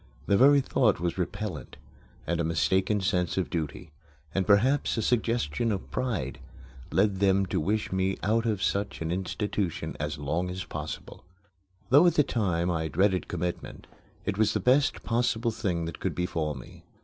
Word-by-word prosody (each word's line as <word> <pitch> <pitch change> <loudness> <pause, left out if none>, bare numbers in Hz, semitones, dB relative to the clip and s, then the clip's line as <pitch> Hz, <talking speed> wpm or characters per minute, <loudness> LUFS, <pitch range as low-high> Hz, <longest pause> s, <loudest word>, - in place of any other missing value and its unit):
The 100 - +3
very 140 +5 +6
thought 120 -5 +2
was 85 +1 -2
repellent; 95 - -4 0.5
and 85 +1 -1
a - - 0
mistaken 95 +6 +1
sense 90 -1 0
of 95 - -1
duty 80 +1 -4 0.4
and 95 -1 0
perhaps 125 +7 +3
a - - +1
suggestion 115 -4 0
of 100 - -4
pride 110 - -2 0.5
led 95 0 +2
them 100 0 +3
to - - -1
wish 105 +7 -1
me 95 0 0
out 115 +4 +1
of 105 -3 -1
such 100 -4 -1
an 80 - -2
institution 95 0 -2
as 75 +2 -3
long 80 +5 -2
as 90 0 -4
possible. 75 -2 -7 0.7
Though 145 +7 +7
at 170 - +3
the 150 - +5
time 90 -9 0
I 80 -2 -1
dreaded 95 +3 +1
commitment, 90 0 -4 0.4
it 100 0 -2
was 110 - +3
the - - +2
best 135 +2 +2
possible 120 0 0
thing 90 -6 -2
that 85 -2 -6
could - - -2
befall 85 -4 -2
me. 65 - -12
95 Hz, 170 wpm, -28 LUFS, 85-110 Hz, 0.7 s, Though